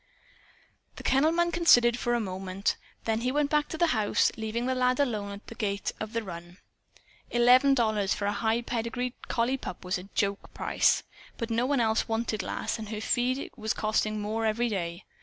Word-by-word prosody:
The - - -9
kennel 275 +4 +3
man 345 +1 +1
considered 245 -9 +5
for 240 0 0
a - - +1
moment. 190 -1 -2 0.3
Then 225 0 0
he 250 +1 0
went 290 0 +1
back 300 -1 +2
to 320 - -4
the 345 - +4
house, 215 -3 +2
leaving 225 +2 -3
the 260 - +1
lad 255 0 +1
alone 215 -7 0
at 200 +1 -9
the - - -9
gate 200 -2 -2
of 215 +1 -5
the 230 0 -1
run. 175 -2 -9 0.7
Eleven 250 +3 +5
dollars, 215 -5 +1
for 200 - -3
a 205 - +1
high 220 +3 0
pedigreed 240 +1 -2
collie 245 +3 +1
pup, 185 -8 -7
was 180 0 -1
a 190 +2 -12
joke 200 0 -1
price. - - +2 0.3
But 230 -1 -4
no 235 +2 +1
one 280 -1 +2
else 220 -1 +1
wanted 225 -2 -1
Lass, 185 - -3
and 215 -1 -6
her 215 -1 -4
feed 250 +4 0
was 220 -3 -2
costing 215 0 0
more 215 +2 -2
every 225 +2 +1
day. 175 -3 -4
225 Hz, 195 wpm, -28 LUFS, 205-250 Hz, 0.7 s, considered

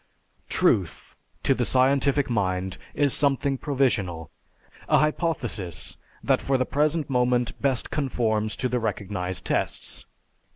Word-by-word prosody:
Truth 90 -6 0 0.2
to - - +4
the - - -1
scientific 140 +2 +2
mind 95 -4 -1 0.2
is 145 -2 +3
something 140 -1 +1
provisional, 105 - 0 0.6
a - - +5
hypothesis 120 - -2 0.3
that - - +2
for 135 -1 +1
the 130 - +1
present 150 +3 0
moment 125 -2 +1
best 135 -4 0
conforms 110 -6 0
to 130 - -1
the 125 0 0
recognized 95 -4 -3
tests. - - -2
125 Hz, 120 wpm, -25 LUFS, 100-140 Hz, 0.6 s, a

